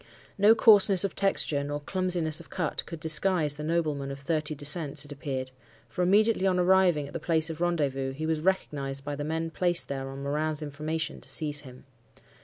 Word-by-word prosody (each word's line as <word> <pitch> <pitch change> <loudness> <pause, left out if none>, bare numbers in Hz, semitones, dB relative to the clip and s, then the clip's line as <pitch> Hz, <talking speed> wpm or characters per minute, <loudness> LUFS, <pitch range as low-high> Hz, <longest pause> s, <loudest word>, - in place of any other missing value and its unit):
No 210 +3 +5
coarseness 205 -4 +5
of 195 - -3
texture, 165 -7 +1
nor 145 +1 -4
clumsiness 175 -1 -1
of 170 - -14
cut 165 -5 -3
could 165 - -7
disguise 160 -1 +2
the 150 +1 -8
nobleman 155 -4 -1
of 135 - -6
thirty 155 +1 -2
descents, 145 0 +2
it 145 - -13
appeared; 130 -2 -5 0.4
for 120 +9 -5
immediately 200 +2 +3
on 185 -1 +1
arriving 180 -4 +3
at 140 - -11
the - - -4
place 165 -1 +1
of 160 +1 -9
rendezvous, 140 -6 -1
he 155 +4 -5
was 160 -1 -1
recognized 140 -7 -2
by 145 - -3
the 145 - -5
men 160 +2 -3
placed 175 0 0
there 135 -1 -4
on 135 +1 -8
Morin's 150 +2 -1
information 155 +2 -4
to - - -10
seize 150 -2 0
him. 130 -1 -14
155 Hz, 195 wpm, -27 LUFS, 145-175 Hz, 0.4 s, No